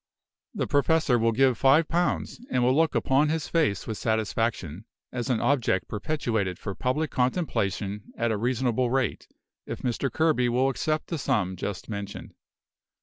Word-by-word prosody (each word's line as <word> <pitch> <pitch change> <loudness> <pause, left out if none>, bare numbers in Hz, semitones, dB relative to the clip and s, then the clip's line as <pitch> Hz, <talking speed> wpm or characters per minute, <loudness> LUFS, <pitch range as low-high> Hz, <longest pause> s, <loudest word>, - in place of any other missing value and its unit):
"The - - 0
Professor 145 -2 +2
will 115 0 +3
give 130 +1 +3
five 145 +4 +5
pounds; 175 +7 -1
and 125 - +1
will 130 +2 +3
look 160 +1 +2
upon 140 +3 +3
his 160 -1 -1
face 155 - +1
with 110 - -5
satisfaction, 110 -5 -1 0.3
as 125 +1 -3
an 120 -3 +2
object 135 -5 +1
perpetuated 110 - -2
for 100 - -5
public 145 +9 -1
contemplation 105 - -1
at 115 0 +1
a - - +1
reasonable 125 +1 0
rate, 130 -4 -1 0.4
if - - -6
Mr. 130 +2 -1
Kerby 155 -6 +2
will 130 +3 +2
accept 155 +3 -1
the 165 - -2
sum 95 -8 0
just 95 +1 -5
mentioned. 100 -2 -6
125 Hz, 155 wpm, -26 LUFS, 110-145 Hz, 0.4 s, five